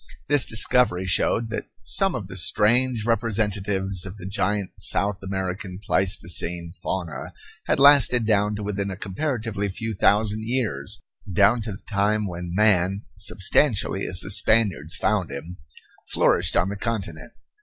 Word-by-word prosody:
This 145 -3 +4
discovery 110 -4 +2
showed 110 +5 +1
that 110 - -5 0.2
some 195 -2 +1
of 100 - -5
the 95 - -10
strange 115 +5 +2
representatives 100 -5 -1
of 95 +1 -7
the 90 - -10
giant 100 0 -2
South 100 +3 +1
American 95 -1 -5
Pleistocene 90 -3 -1
fauna 85 -5 -4 0.3
had - - +1
lasted 135 -4 +6
down 105 -1 +1
to 105 - -6
within 100 -1 -3
a 95 - -6
comparatively 105 -1 -3
few 110 +4 -4
thousand 105 +2 +1
years, 105 - -2 0.3
down 100 +6 +3
to 110 0 -5
the 95 - -12
time 105 +1 0
when 90 -1 -6
man, 100 -2 +2 0.2
substantially 100 0 +1
as 90 0 +4
the 100 - -1
Spaniards 100 -7 +3
found 105 -6 -1
him, 80 +6 -8 0.5
flourished 85 +1 +1
on 90 +3 +2
the 100 - -5
continent. 95 -7 -5
100 Hz, 145 wpm, -23 LUFS, 95-110 Hz, 0.5 s, lasted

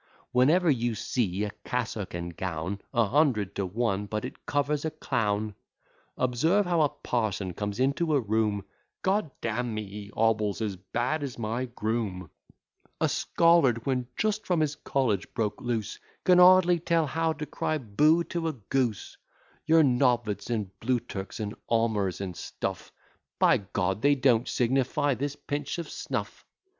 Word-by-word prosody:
'Whenever 155 +9 +4
you 120 -3 0
see 105 -3 -1
a 105 - -2
cassock 115 -7 -3
and 85 0 -5
gown, 90 +3 -3
A 115 -1 +3
hundred 120 -5 +2
to 100 -2 -2
one 105 0 -1
but 105 +1 -3
it - - -10
covers 145 0 0
a 160 - 0
clown. 110 -8 -1 0.6
Observe 160 +11 +2
how 175 -2 +2
a 150 - +4
parson 105 -9 -2
comes 105 +4 -4
into 145 +4 +2
a - - +4
room; 105 -3 0 0.4
G 195 +3 +3
d - - -13 0.2
d - - 0
n 120 0 -2
me, 110 0 -3
he 100 +1 -9
hobbles 110 -2 +1
as 105 -3 -2
bad 120 - -2
as 135 -3 -5
my 115 +3 -2
groom; 110 -7 -3 0.7
A - - +3
scholard, 155 -9 +3
when 125 -2 0
just 215 0 0
from 175 -3 +2
his 150 -1 +1
college 125 -10 -1
broke 110 -4 -1
loose, 115 -4 -3 0.2
Can 180 -1 +5
hardly 180 -1 +7
tell 165 -1 +2
how 160 +2 0
to 150 -1 -5
cry 155 +1 -2
bo 150 +8 +3
to 170 -1 -3
a 160 - -1
goose; 120 -2 -2 0.5
Your 160 0 +6
Noveds, 125 -5 +1
and 105 -5 -2
Bluturks, 115 -4 -3
and 105 -1 -3 0.2
Omurs, 110 -6 +1
and 95 -3 -4
stuff - - -5 0.5
By - - +4
G, 95 -1 -1
they 145 +4 +4
don't 125 -3 +3
signify 135 +4 +1
this 140 +3 -3
pinch 145 +1 -4
of 170 -2 -4
snuff. - - -4
120 Hz, 160 wpm, -28 LUFS, 105-145 Hz, 0.7 s, hardly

